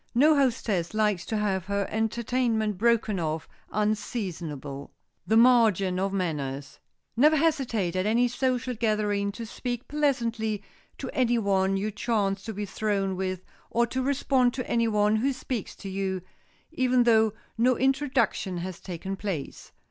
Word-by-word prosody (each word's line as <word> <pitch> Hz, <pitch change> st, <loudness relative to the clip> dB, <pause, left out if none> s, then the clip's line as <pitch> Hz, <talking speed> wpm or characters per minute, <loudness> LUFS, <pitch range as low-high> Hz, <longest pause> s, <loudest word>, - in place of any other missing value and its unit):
No 300 Hz, +5 st, +6 dB
hostess 225 Hz, -, 0 dB
likes 210 Hz, -4 st, +1 dB
to 220 Hz, -, -1 dB
have 195 Hz, -4 st, 0 dB
her 200 Hz, 0 st, -1 dB
entertainment 225 Hz, -2 st, 0 dB
broken 225 Hz, -3 st, +2 dB
off 160 Hz, -1 st, -2 dB, 0.2 s
unseasonably. 175 Hz, -, -3 dB
[Sidenote: -, -, -20 dB, 0.4 s
THE 220 Hz, +3 st, +4 dB
MARGIN 220 Hz, -7 st, +4 dB
OF 195 Hz, +1 st, 0 dB
MANNERS] 145 Hz, -7 st, -3 dB, 0.4 s
Never 300 Hz, +6 st, +5 dB
hesitate 255 Hz, -, +1 dB
at 185 Hz, +2 st, 0 dB
any 235 Hz, +3 st, +3 dB
social 250 Hz, 0 st, -1 dB
gathering 210 Hz, -3 st, 0 dB
to 230 Hz, +2 st, -6 dB
speak 245 Hz, +2 st, -5 dB
pleasantly 235 Hz, -8 st, 0 dB, 0.3 s
to 265 Hz, -, -5 dB
any 240 Hz, -2 st, +2 dB
one 195 Hz, -2 st, +1 dB
you 210 Hz, +2 st, -2 dB
chance 205 Hz, -3 st, -1 dB
to 225 Hz, -, -4 dB
be 205 Hz, +1 st, -3 dB
thrown 195 Hz, -1 st, -1 dB
with 185 Hz, -1 st, -3 dB, 0.3 s
or 235 Hz, 0 st, +2 dB
to 260 Hz, +2 st, -3 dB
respond 260 Hz, -2 st, +2 dB
to 255 Hz, -, -4 dB
any 230 Hz, -1 st, +2 dB
one 210 Hz, 0 st, +2 dB
who 265 Hz, +5 st, +1 dB
speaks 255 Hz, -4 st, -4 dB
to 195 Hz, -, -9 dB
you, 190 Hz, -1 st, -2 dB, 0.5 s
even 255 Hz, -1 st, +3 dB
though 220 Hz, -2 st, +4 dB, 0.2 s
no 245 Hz, +2 st, +3 dB
introduction 265 Hz, -8 st, +1 dB
has 180 Hz, 0 st, -5 dB
taken 190 Hz, +2 st, -5 dB
place. 190 Hz, -8 st, -5 dB
215 Hz, 150 wpm, -27 LUFS, 195-245 Hz, 0.5 s, No